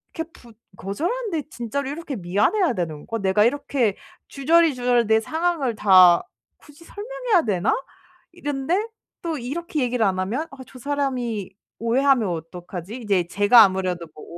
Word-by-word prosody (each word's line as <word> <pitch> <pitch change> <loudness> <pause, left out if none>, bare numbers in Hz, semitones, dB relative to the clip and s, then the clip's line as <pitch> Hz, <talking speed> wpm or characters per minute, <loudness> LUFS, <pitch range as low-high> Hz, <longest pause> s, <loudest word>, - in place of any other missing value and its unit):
이렇게 325 0 -5
부 235 -6 -17 0.2
거절하는데 335 - -3
진짜로 260 +3 -4
이렇게 295 -1 -5
미안해야 215 - +1
되는 160 -7 -4
거? 225 - -3
내가 195 +1 +2
이렇게 245 -3 +1 0.3
주저리, 320 +3 +3
주저리 245 -1 +2
내 220 +1 +4
상황을 315 -1 -1
다 185 -4 +6 0.3
굳이 295 +2 -18
설명해야 465 -1 -1
되나?' 200 -2 +1 0.6
이랬는데 335 +5 -2 0.4
또 330 -2 -2
이렇게 300 +5 -4
얘기를 245 -2 0
안 190 -2 +1
하면 235 +13 -2
'아 275 - -12
저 255 - -13
사람이 250 -7 -2 0.3
오해하면 245 0 +2
어떡하지?' 175 +3 -7
이제 200 -7 0
제가 205 +6 +6
아무래도 185 -3 -1
뭐 150 - -11
245 Hz, 340 characters per minute, -23 LUFS, 200-305 Hz, 0.6 s, 다